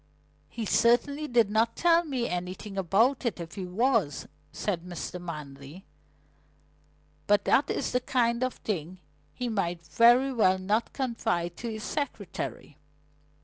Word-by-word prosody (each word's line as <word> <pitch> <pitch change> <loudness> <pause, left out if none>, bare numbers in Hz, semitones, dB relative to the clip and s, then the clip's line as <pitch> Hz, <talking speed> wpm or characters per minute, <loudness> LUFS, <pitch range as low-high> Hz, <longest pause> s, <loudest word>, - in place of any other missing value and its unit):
"He 230 -2 -5
certainly 280 +8 +2
did 235 -6 +3
not 225 +2 +2
tell 340 0 +4
me 260 -7 -2
anything 180 +3 -5
about 205 +9 +2
it 235 -7 -2
if 170 0 -7
he 190 -3 -5
was," 205 - +1 0.2
said 185 -5 -2
Mr. 180 0 -6
Manley. 150 0 -8 1.4
"But 205 -1 +3
that 280 +2 +3
is - - -1
the 250 - +2
kind 235 -1 +1
of 255 - -1
thing 180 -3 -4 0.3
he 250 - -4
might 175 -6 -2
very 245 +3 +5
well 190 -6 +3
not 205 +5 0
confide 175 -10 -2
to 235 - -5
his 215 -1 -6
secretary." 210 - -5
215 Hz, 140 wpm, -28 LUFS, 180-245 Hz, 1.4 s, very